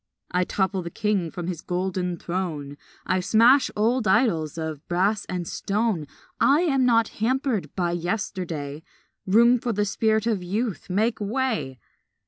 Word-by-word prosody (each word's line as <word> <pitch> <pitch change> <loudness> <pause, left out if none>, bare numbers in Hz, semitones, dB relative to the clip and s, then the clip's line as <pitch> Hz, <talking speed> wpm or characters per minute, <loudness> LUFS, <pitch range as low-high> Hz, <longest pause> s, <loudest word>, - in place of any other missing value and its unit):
I 180 0 +1
topple 190 0 0
the 170 - -6
king 200 -2 -1
from 175 +1 -6
his 175 -2 -4
golden 180 -1 -2
throne, 165 -6 -4 0.3
I 185 +1 +1
smash 230 +8 +5
old 225 +2 +1
idols 190 - +2
of 160 -2 -4
brass 195 +4 +1
and 180 -2 -4
stone, 205 -6 -1 0.3
I 285 +4 +4
am 270 -7 +2
not 230 -2 +3
hampered 240 - 0
by 175 -2 0
yesterday. 175 -5 -3 0.5
Room 235 +5 +5
for 235 0 -2
the 205 0 +1
spirit 220 +1 +1
of 220 -5 0
Youth; 200 +1 -3
make 215 +5 0
way! 220 - -1
195 Hz, 145 wpm, -25 LUFS, 175-225 Hz, 0.5 s, smash